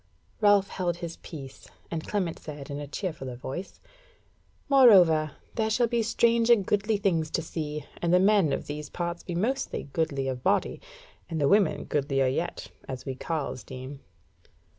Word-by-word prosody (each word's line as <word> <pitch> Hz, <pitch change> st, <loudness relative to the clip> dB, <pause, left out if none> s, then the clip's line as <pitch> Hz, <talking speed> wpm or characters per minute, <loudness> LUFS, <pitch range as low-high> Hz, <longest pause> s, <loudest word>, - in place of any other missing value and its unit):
Ralph 205 Hz, -2 st, +4 dB
held 175 Hz, -2 st, -2 dB
his 170 Hz, -1 st, -6 dB
peace, 135 Hz, -5 st, -10 dB, 0.2 s
and 160 Hz, -2 st, -4 dB
Clement 185 Hz, -6 st, -1 dB
said 145 Hz, -2 st, -8 dB
in 140 Hz, -, -4 dB
a 145 Hz, -, -6 dB
cheerfuller 145 Hz, -6 st, -5 dB
voice: 135 Hz, +9 st, -7 dB, 0.9 s
"Moreover, 185 Hz, -, +6 dB, 0.2 s
there 220 Hz, -1 st, 0 dB
shall 240 Hz, +3 st, +3 dB
be 235 Hz, 0 st, 0 dB
strange 230 Hz, +1 st, +2 dB
and 225 Hz, -5 st, +5 dB
goodly 210 Hz, +2 st, +1 dB
things 170 Hz, -6 st, +1 dB
to 165 Hz, -, -1 dB
see; 150 Hz, -2 st, -4 dB, 0.2 s
and 170 Hz, -, +1 dB
the 180 Hz, -, +6 dB
men 195 Hz, -5 st, +4 dB
of -, -, -2 dB
these 150 Hz, 0 st, -6 dB
parts 170 Hz, 0 st, -4 dB
be 175 Hz, -, -5 dB
mostly 230 Hz, -, -2 dB
goodly 140 Hz, -5 st, 0 dB
of 130 Hz, -1 st, -3 dB
body, -, -, +1 dB, 0.5 s
and 165 Hz, -2 st, -2 dB
the 140 Hz, -, +3 dB
women 190 Hz, -4 st, +3 dB
goodlier 140 Hz, -2 st, 0 dB
yet, 165 Hz, +7 st, -2 dB, 0.2 s
as 130 Hz, -1 st, -6 dB
we 135 Hz, -, -3 dB
carles 145 Hz, -2 st, -4 dB
deem." 130 Hz, +2 st, -8 dB
165 Hz, 165 wpm, -27 LUFS, 145-205 Hz, 0.9 s, Moreover